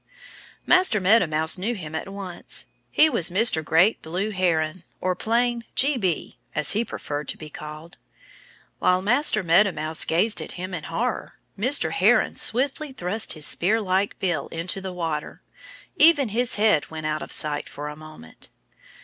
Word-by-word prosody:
Master 365 - +4
Meadow 200 +1 +4
Mouse 160 +3 0
knew 225 +6 -2
him 160 -6 -7
at 160 +4 -4
once. 195 -3 -4 0.2
He 310 - +5
was 230 - +1
Mr. 185 -3 +2
Great 170 +8 +3
Blue 180 +7 -3
Heron 170 -3 0 0.2
or 185 0 -1
plain 235 +3 0
"G. 280 +3 +3
B." 185 -9 -2 0.2
as 150 -1 +3
he 220 +3 +1
preferred 145 - -6
to - - -4
be 155 -1 -10
called. 155 +3 -10 0.8
While 180 0 +2
Master 250 +3 +2
Meadow 180 +4 +4
Mouse 155 -1 -1
gazed 210 +7 +1
at - - -6
him 185 +1 -6
in 160 -4 -5
horror 235 +9 -3 0.2
Mr. 220 - +1
Heron 210 +8 +3
swiftly 275 +5 +1
thrust 205 0 -2
his 155 -2 -2
spearlike 200 0 +1
bill 175 -4 -1
into 175 +4 -4
the 190 -1 -5
water. 165 -4 -4 0.5
Even 300 -5 +6
his 240 +3 0
head 210 -8 +2
went 155 -1 -7
out 155 0 -2
of - - -8
sight 150 -1 +1
for 145 +1 -7
a 150 - -7
moment. 155 - -10
185 Hz, 165 wpm, -24 LUFS, 160-225 Hz, 0.8 s, Even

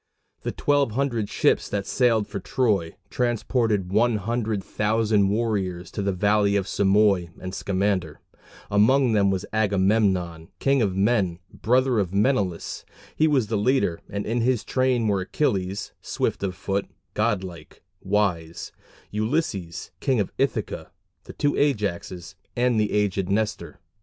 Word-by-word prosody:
The - - -3
twelve 145 -5 +1
hundred 120 -5 -1
ships - - +1
that 100 -1 -2
sailed 115 -4 +2
for 100 - -5
Troy 100 -7 0 0.2
transported 115 -5 0
one 115 +3 +3
hundred 110 -1 -2
thousand 105 -1 +1
warriors 100 -5 -1
to - - -4
the 100 0 0
valley 100 +2 +2
of 100 -2 +1
Simois 100 -3 +3
and 95 0 -6
Scamander. 95 -5 -1 0.5
Among 125 +5 +4
them 100 -2 +3
was 95 -1 -1
Agamemnon, 95 -5 +1
"king 135 -1 +2
of 100 -4 0
men," 95 -4 +1 0.2
brother 125 0 +2
of 95 -1 -2
Menelaus. 100 -6 0 0.3
He 155 - +3
was 140 -6 +2
the 105 0 -1
leader, 105 -7 +1
and 100 0 -4
in 115 +2 0
his 125 -1 +1
train 130 -3 +1
were 100 -2 +1
Achilles, 95 -3 -1
"swift - - -2
of 95 -2 -2
foot"; 100 +2 -2 0.3
"god 105 -3 +1
like, 85 -5 -11 0.2
wise" 95 -5 -1 0.4
Ulysses, 105 - -2
King 130 -5 +1
of 100 - -1
Ithaca, 110 - -1 0.4
the - - -9
two 145 -1 0
Ajaxes, 100 - -1 0.2
and 120 -2 +2
the 105 - +1
aged 100 -2 0
Nestor. 100 -6 -2
105 Hz, 140 wpm, -24 LUFS, 95-115 Hz, 0.5 s, Among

